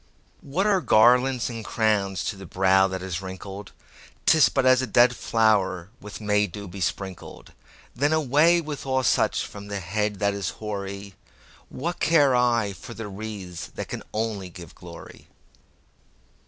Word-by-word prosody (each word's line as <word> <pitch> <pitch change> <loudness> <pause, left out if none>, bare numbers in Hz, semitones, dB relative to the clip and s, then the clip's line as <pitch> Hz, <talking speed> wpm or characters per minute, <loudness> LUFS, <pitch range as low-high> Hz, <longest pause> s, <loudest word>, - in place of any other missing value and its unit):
What 160 +8 -2
are 200 -3 +3
garlands 125 +1 +4
and 115 -2 -6
crowns 105 -5 0
to - - -3
the 95 -1 -11
brow 95 +1 +3
that 95 -1 -5
is 95 -1 -4
wrinkled?'Tis 100 - -1
but 135 -2 0
as 130 0 +5
a 130 - -2
dead 120 +3 +4
flower 100 -6 +1
with 105 0 -9
May 105 -1 +1
dew 100 +2 -8
besprinkled:Then 95 - -5
away 155 +3 +3
with 150 -3 -7
all 130 0 +1
such - - +1
from 100 0 -10
the 100 -1 -4
head 105 +4 -2
that 100 0 0
is 100 -3 -3 1.2
hoary—What 170 +6 -4
care 145 -6 +4
I 120 -4 +2
for 115 +7 -11
the 110 -2 -6
wreaths 100 -4 -7
that - - -6
can - - -5
only 105 -4 -3
give 85 -3 -12
glory? 85 -1 -13
105 Hz, 145 wpm, -25 LUFS, 95-130 Hz, 1.2 s, as